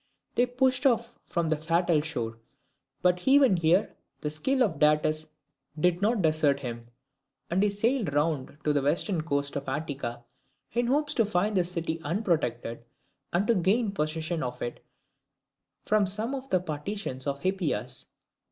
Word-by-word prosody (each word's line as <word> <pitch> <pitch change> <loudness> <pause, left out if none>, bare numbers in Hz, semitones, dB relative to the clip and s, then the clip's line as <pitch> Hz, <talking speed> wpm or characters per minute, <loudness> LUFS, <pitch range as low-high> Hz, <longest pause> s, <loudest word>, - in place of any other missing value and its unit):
They 245 - +3
pushed 260 +2 +2
off 235 -1 0
from 170 -2 -1
the 155 - +3
fatal 165 +1 +2
shore: 115 -7 -4 0.6
but 180 +2 +2
even 270 -6 +6
here 170 +4 +2 0.3
the 150 - -2
skill 260 - +1
of 195 -9 -1
Datis 155 +1 +2 0.5
did 175 +2 +2
not 215 -1 +2
desert 155 -3 +2
him, 120 -3 -5 0.7
and 180 +3 +2
he 210 - +4
sailed 215 - 0
round 145 -1 -1
to 150 - +2
the 145 - +2
western 165 +5 +1
coast 140 -3 -1
of 140 -1 -3
Attica, 135 -5 -4 0.5
in 240 0 +1
hopes 290 +3 +1
to 230 - +3
find 205 +1 0
the 185 - +4
city 170 -2 -3
unprotected, 145 - -1 0.5
and 180 +4 +1
to 235 - +4
gain 205 +3 +2
possession 160 -1 -2
of 125 0 -4
it 120 - -5 1.0
from 210 -2 +2
some 215 +7 -1
of 270 0 -5
the 185 - +3
partisans 155 -4 -4
of 140 0 -2
Hippias. 155 - -1
170 Hz, 155 wpm, -28 LUFS, 150-210 Hz, 1.0 s, even